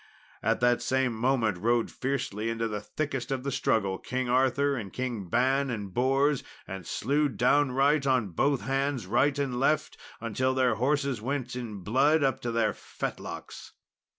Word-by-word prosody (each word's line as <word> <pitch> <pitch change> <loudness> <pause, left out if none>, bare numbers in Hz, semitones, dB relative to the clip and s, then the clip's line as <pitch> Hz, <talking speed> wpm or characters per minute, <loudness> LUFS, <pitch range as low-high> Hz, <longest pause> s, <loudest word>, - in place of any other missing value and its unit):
At - - +1
that 120 0 +3
same 130 -2 +1
moment 115 -4 +1
rode 115 +3 +1
fiercely 125 -5 -2
into 115 0 -1
the 105 -2 -4
thickest 135 +2 -3
of 135 -2 -2
the 140 - -2
struggle 100 -6 0
King 130 -1 -3
Arthur 135 +3 +2
and 105 -7 -5
Kings 120 -8 -4
Ban 135 +6 +2
and 105 -5 -4
Bors, 135 +4 +2 0.2
and 95 -2 -7
slew 145 +2 +1
downright 140 +4 +2
on 130 -6 +2
both 135 - +1
hands 135 -3 -1
right 130 +8 +2
and 135 -4 -1
left, 150 +4 +1 0.2
until 130 +4 -1
their 130 -3 +3
horses 135 0 0
went 125 0 -3
in 110 -6 -6
blood 140 - +3
up 135 -1 +1
to 120 - -3
the 115 -2 +1
fetlocks. - - -7
130 Hz, 160 wpm, -28 LUFS, 115-135 Hz, 0.2 s, that